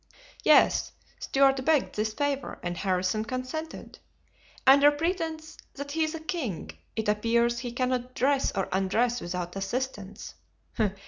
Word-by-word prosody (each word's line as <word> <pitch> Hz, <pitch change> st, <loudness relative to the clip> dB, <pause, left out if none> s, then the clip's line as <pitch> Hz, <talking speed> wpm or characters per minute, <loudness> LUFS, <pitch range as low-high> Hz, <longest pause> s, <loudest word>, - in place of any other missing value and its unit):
"Yes; -, -, +4 dB, 0.3 s
Stuart 270 Hz, -1 st, +3 dB
begged 300 Hz, 0 st, +2 dB
this 215 Hz, +1 st, -1 dB
favor 280 Hz, +3 st, -2 dB
and 175 Hz, 0 st, -2 dB
Harrison 185 Hz, +3 st, 0 dB
consented. 255 Hz, +7 st, -6 dB, 0.7 s
Under 280 Hz, +2 st, +8 dB
pretense 320 Hz, 0 st, -3 dB, 0.2 s
that 285 Hz, +1 st, -6 dB
he's 315 Hz, +1 st, 0 dB
a -, -, -5 dB
king 315 Hz, -, -4 dB, 0.2 s
it 220 Hz, -1 st, -2 dB
appears 235 Hz, +3 st, +2 dB
he 245 Hz, -1 st, -5 dB
cannot 250 Hz, 0 st, -2 dB
dress 275 Hz, +1 st, +2 dB
or 195 Hz, -, 0 dB
undress 220 Hz, +6 st, +1 dB
without 175 Hz, 0 st, -4 dB
assistance." 205 Hz, 0 st, -4 dB
255 Hz, 125 wpm, -28 LUFS, 210-285 Hz, 0.7 s, Under